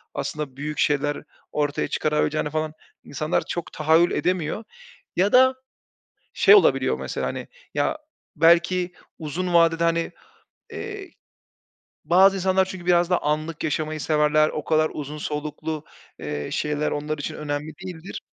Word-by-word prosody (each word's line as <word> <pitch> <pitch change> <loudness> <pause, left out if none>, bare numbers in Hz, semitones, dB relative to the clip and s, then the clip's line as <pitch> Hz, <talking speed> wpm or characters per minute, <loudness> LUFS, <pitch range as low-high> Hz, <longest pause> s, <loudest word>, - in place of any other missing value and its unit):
aslında 145 -3 -4
büyük 150 +1 -4
şeyler 145 0 +1 0.3
ortaya 145 -1 0
çıkarabileceğini 150 0 0
falan 155 0 -2 0.3
insanlar 155 +4 -2
çok 175 - -5
tahayyül 160 +3 +3
edemiyor. 180 +3 -1 0.5
Ya 195 +3 +2
da 260 +1 +6 0.8
şey 420 - +6
olabiliyor, 415 - +4
mesela, - - -3
hani, - - -5 0.3
ya, - - 0 0.4
belki 170 +3 +4 0.3
uzun 175 +3 -3
vadede, 165 0 +4
hani, 165 0 0 0.6
eee, 410 -3 -7 0.9
bazı 190 +3 +5
insanlar 190 0 +2
çünkü 185 -2 -8
biraz 175 0 +3
daha 180 - +3
anlık 155 +2 -2
yaşamayı 155 0 -2
severler, 155 0 +3
o 150 - -5
kadar 155 0 +2
uzun 150 0 -6
soluklu, 150 +1 -4 0.4
eee, 75 -1 -4
şeyler 150 0 -1
onlar 150 +1 -3
için 145 - -4
önemli 150 +1 -4
değildir. 180 0 -7
155 Hz, 130 wpm, -24 LUFS, 150-175 Hz, 0.9 s, da